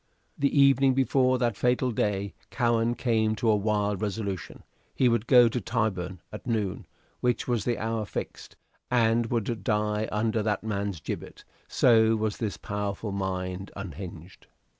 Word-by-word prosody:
The 140 Hz, 0 st, +1 dB
evening 135 Hz, -1 st, +5 dB
before 130 Hz, -1 st, +3 dB
that 120 Hz, -3 st, 0 dB
fatal 125 Hz, +3 st, +1 dB
day 100 Hz, -3 st, -1 dB, 0.2 s
Cowen 120 Hz, 0 st, +1 dB
came 110 Hz, -3 st, +1 dB
to 110 Hz, +1 st, +2 dB
a -, -, +4 dB
wild 105 Hz, -1 st, 0 dB
resolution; 100 Hz, -2 st, -4 dB, 0.3 s
he 130 Hz, -, +3 dB
would 115 Hz, -1 st, +1 dB
go 125 Hz, -2 st, +7 dB
to 120 Hz, +1 st, -2 dB
Tyburn 95 Hz, -5 st, -2 dB
at 105 Hz, -, -9 dB
noon, 105 Hz, -5 st, -2 dB, 0.3 s
which 125 Hz, -1 st, 0 dB
was 120 Hz, -5 st, 0 dB
the 120 Hz, -1 st, 0 dB
hour 110 Hz, -1 st, -2 dB
fixed, -, -, -6 dB, 0.3 s
and 115 Hz, -1 st, +2 dB
would 115 Hz, -1 st, -2 dB
die 105 Hz, -1 st, 0 dB
under 110 Hz, +1 st, 0 dB
that 105 Hz, 0 st, -1 dB
man's 100 Hz, -5 st, -3 dB
gibbet -, -, -6 dB, 0.2 s
so 115 Hz, -2 st, +4 dB
was 110 Hz, -1 st, -1 dB
this 110 Hz, -4 st, -3 dB
powerful 105 Hz, 0 st, -4 dB
mind 95 Hz, -1 st, -3 dB
unhinged. 90 Hz, -2 st, -9 dB
110 Hz, 150 wpm, -27 LUFS, 100-120 Hz, 0.3 s, go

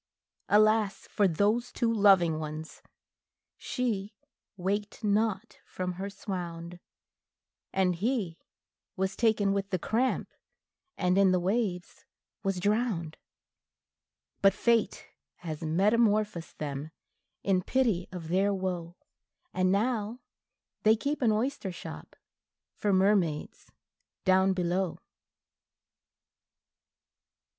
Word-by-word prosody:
Alas 215 Hz, -1 st, +3 dB
for 205 Hz, -, +3 dB
those 210 Hz, +8 st, +1 dB
two 230 Hz, -1 st, 0 dB
loving 190 Hz, -7 st, +5 dB
ones! 155 Hz, +1 st, -7 dB, 0.7 s
she 210 Hz, -5 st, -3 dB, 0.4 s
waked 205 Hz, +4 st, -2 dB
not 215 Hz, +1 st, 0 dB
from 185 Hz, 0 st, -4 dB
her 195 Hz, +3 st, -5 dB
swound, 175 Hz, -4 st, -6 dB, 0.9 s
And 185 Hz, -1 st, +2 dB
he 205 Hz, -5 st, -1 dB, 0.6 s
was 190 Hz, +1 st, -1 dB
taken 215 Hz, -4 st, +2 dB
with 200 Hz, 0 st, -2 dB
the 185 Hz, -, 0 dB
cramp, 235 Hz, +8 st, 0 dB, 0.7 s
and 180 Hz, +1 st, +2 dB
in 195 Hz, -2 st, +5 dB
the 185 Hz, -, +3 dB
waves 185 Hz, -1 st, -2 dB, 0.4 s
was 195 Hz, -2 st, -1 dB
drowned; 205 Hz, -5 st, 0 dB, 1.3 s
But 195 Hz, 0 st, +5 dB
Fate 235 Hz, -2 st, +1 dB, 0.3 s
has 160 Hz, -4 st, -6 dB
metamorphosed 205 Hz, +2 st, +1 dB
them, 145 Hz, 0 st, -4 dB, 0.5 s
in 190 Hz, -2 st, +2 dB
pity 220 Hz, -5 st, +1 dB
of 170 Hz, -3 st, -7 dB
their 195 Hz, +3 st, +2 dB
woe, 180 Hz, -3 st, -3 dB, 0.6 s
And 185 Hz, 0 st, +2 dB
now 220 Hz, +2 st, 0 dB, 0.6 s
they 215 Hz, +1 st, +5 dB
keep 285 Hz, +6 st, -2 dB
an 235 Hz, -3 st, +4 dB
oyster 215 Hz, -2 st, -1 dB
shop 175 Hz, -, -9 dB, 0.6 s
for 210 Hz, -, -1 dB
mermaids 190 Hz, -5 st, +1 dB, 0.5 s
down 190 Hz, 0 st, +4 dB
below. 180 Hz, 0 st, -1 dB
195 Hz, 100 wpm, -29 LUFS, 180-215 Hz, 1.3 s, loving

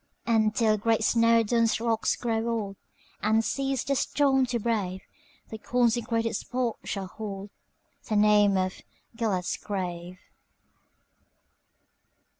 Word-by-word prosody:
And, 220 Hz, -2 st, +2 dB
till 215 Hz, -2 st, +2 dB
great 225 Hz, +1 st, +1 dB
Snowdon's 230 Hz, 0 st, +3 dB
rocks 225 Hz, -1 st, 0 dB
grow 230 Hz, -1 st, -2 dB
old, 210 Hz, -4 st, -2 dB, 0.5 s
And 220 Hz, +1 st, +2 dB
cease 270 Hz, -2 st, -1 dB
the 280 Hz, -, 0 dB
storm 270 Hz, -1 st, +2 dB
to 240 Hz, 0 st, -1 dB
brave, 205 Hz, -5 st, -2 dB, 0.5 s
The 220 Hz, -, -7 dB
consecrated 230 Hz, -1 st, 0 dB
spot 245 Hz, -2 st, -2 dB
shall 195 Hz, -2 st, -4 dB
holdThe 205 Hz, +1 st, -7 dB
name 205 Hz, -1 st, +4 dB
of 185 Hz, 0 st, -2 dB, 0.3 s
"Gêlert's 205 Hz, -6 st, -1 dB
Grave." 180 Hz, -2 st, -5 dB
225 Hz, 105 wpm, -27 LUFS, 205-235 Hz, 0.5 s, name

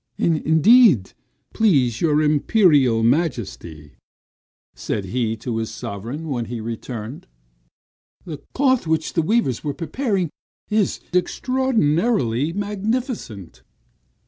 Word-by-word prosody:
"Indeed, 160 Hz, -, +4 dB, 0.4 s
please 135 Hz, -, +2 dB
your 155 Hz, -2 st, +2 dB
Imperial 150 Hz, -, +3 dB
Majesty," 115 Hz, -, -2 dB, 0.8 s
said 100 Hz, -, -4 dB
he 115 Hz, +2 st, -2 dB
to 115 Hz, +1 st, -4 dB
his 110 Hz, -1 st, -3 dB
sovereign 120 Hz, +11 st, -6 dB
when 120 Hz, -4 st, -2 dB
he 120 Hz, +2 st, -6 dB
returned, 115 Hz, +2 st, -7 dB, 1.0 s
"the 150 Hz, -4 st, -7 dB
cloth 260 Hz, -8 st, +2 dB
which 160 Hz, 0 st, -1 dB
the 165 Hz, -, +2 dB
weavers 160 Hz, -, 0 dB
are 145 Hz, -2 st, -3 dB
preparing 185 Hz, -, -2 dB, 0.4 s
is 210 Hz, -2 st, 0 dB
extraordinarily 180 Hz, -, +1 dB
magnificent." 205 Hz, -, -4 dB
150 Hz, 95 wpm, -21 LUFS, -, 1.0 s, Indeed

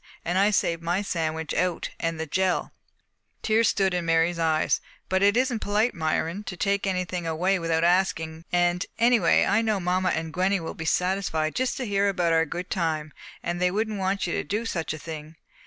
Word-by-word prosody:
And 175 Hz, +3 st, +1 dB
I 200 Hz, +2 st, +5 dB
saved 170 Hz, -5 st, +1 dB
my 175 Hz, +4 st, 0 dB
sandwich 160 Hz, -4 st, -2 dB
out, 180 Hz, 0 st, -1 dB
and 165 Hz, -1 st, -2 dB
the 160 Hz, -, -2 dB
jell!" 185 Hz, +4 st, 0 dB, 0.7 s
Tears 220 Hz, +1 st, +3 dB
stood 195 Hz, -3 st, +1 dB
in 180 Hz, -1 st, 0 dB
Mary's 165 Hz, +1 st, +2 dB
eyes. 160 Hz, -1 st, +2 dB, 0.3 s
"But 190 Hz, 0 st, +1 dB
it 200 Hz, +3 st, +4 dB
isn't 250 Hz, -2 st, +1 dB
polite, 210 Hz, +4 st, +1 dB
Myron, 165 Hz, +4 st, -1 dB
to 180 Hz, -, -6 dB
take 200 Hz, +2 st, 0 dB
anything 180 Hz, -2 st, -2 dB
away 180 Hz, +4 st, +1 dB
without 165 Hz, -1 st, 0 dB
asking 165 Hz, -2 st, +1 dB
and, 175 Hz, 0 st, +2 dB
anyway, 230 Hz, -6 st, +4 dB
I 205 Hz, +3 st, +3 dB
know 215 Hz, -3 st, 0 dB
mamma 185 Hz, +1 st, +1 dB
and 160 Hz, -1 st, -2 dB
Gwenny 190 Hz, +2 st, +1 dB
will 165 Hz, -, -5 dB
be 160 Hz, -, -7 dB
satisfied 180 Hz, -3 st, 0 dB
to -, -, -2 dB
just 260 Hz, -, -2 dB
hear 200 Hz, -5 st, +1 dB
about 175 Hz, -4 st, +1 dB
our 165 Hz, 0 st, +3 dB
good 175 Hz, +3 st, -6 dB
time, 155 Hz, -5 st, -1 dB, 0.3 s
and 175 Hz, +1 st, -3 dB
they 180 Hz, -, +4 dB
wouldn't 215 Hz, +2 st, -2 dB
want 190 Hz, +1 st, 0 dB
you 175 Hz, -, -2 dB
to -, -, -1 dB
do 215 Hz, +3 st, -2 dB
such 170 Hz, -8 st, -2 dB
a 155 Hz, -, -4 dB
thing." 155 Hz, 0 st, -8 dB
180 Hz, 200 wpm, -26 LUFS, 165-200 Hz, 0.7 s, I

